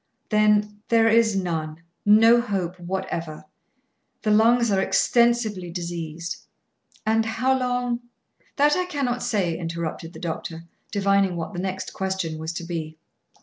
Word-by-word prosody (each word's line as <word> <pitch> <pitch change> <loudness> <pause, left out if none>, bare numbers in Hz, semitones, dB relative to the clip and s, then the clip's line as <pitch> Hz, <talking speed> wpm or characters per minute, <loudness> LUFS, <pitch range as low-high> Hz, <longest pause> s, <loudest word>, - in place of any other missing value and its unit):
"Then, 210 -1 +2
there 225 -1 +5
is 225 -2 +4
none; 165 -4 -3 0.2
no 225 +3 +7
hope 185 -6 -3
whatever. 170 -3 -4 0.8
The 215 - +2
lungs 230 +2 +4
are 190 -1 +2
extensively 235 -6 +2
diseased." 170 -1 -5 0.7
"And 220 +1 +3
how 225 +4 +1
long 245 -1 -1 0.3
" - - -38
"That 295 +1 +4
I 365 - 0
cannot 270 -8 -2
say," 185 -7 0
interrupted 165 0 -5
the - - -10
doctor, 165 -1 -5 0.3
divining 195 -2 +2
what 170 +4 -5
the 175 - -4
next 190 0 -4
question 190 -5 -3
was 160 +1 -4
to 170 - -5
be. 160 -2 -5
195 Hz, 140 wpm, -24 LUFS, 170-225 Hz, 0.8 s, no